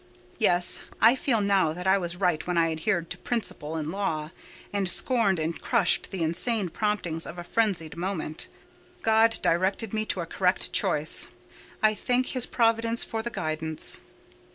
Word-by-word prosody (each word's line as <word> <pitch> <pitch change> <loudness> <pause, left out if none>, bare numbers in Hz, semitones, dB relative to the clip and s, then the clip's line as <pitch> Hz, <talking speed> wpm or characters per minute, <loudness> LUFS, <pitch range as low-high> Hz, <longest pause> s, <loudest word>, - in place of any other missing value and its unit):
Yes; 175 -5 +3 0.2
I 225 +4 +5
feel 245 -4 0
now 195 -6 +1
that 180 +2 -8
I 190 +1 +3
was 175 -1 -2
right 180 -4 -1
when 180 -1 -2
I 165 -1 +2
adhered 170 +1 -2
to - - -4
principle 165 -10 -4
and 155 -1 -4
law, 160 -6 -3 0.4
and 200 -2 0
scorned 225 -2 +2
and 160 +1 -4
crushed - - +2
the 185 -3 -4
insane 185 +5 +1
promptings 180 -5 0
of 170 - -9
a 175 - -7
frenzied 185 -6 -1
moment. 170 -3 -4 0.6
God 225 0 +3
directed 190 +5 0
me 215 0 -1
to - - -2
a - - -5
correct - - -1
choice: - - +3 0.6
I 215 0 +4
thank 250 +4 -1
His 255 -2 +3
providence 230 0 +2
for 225 -1 -4
the 235 - -5
guidance! 160 -5 +1
190 Hz, 165 wpm, -26 LUFS, 165-220 Hz, 0.6 s, I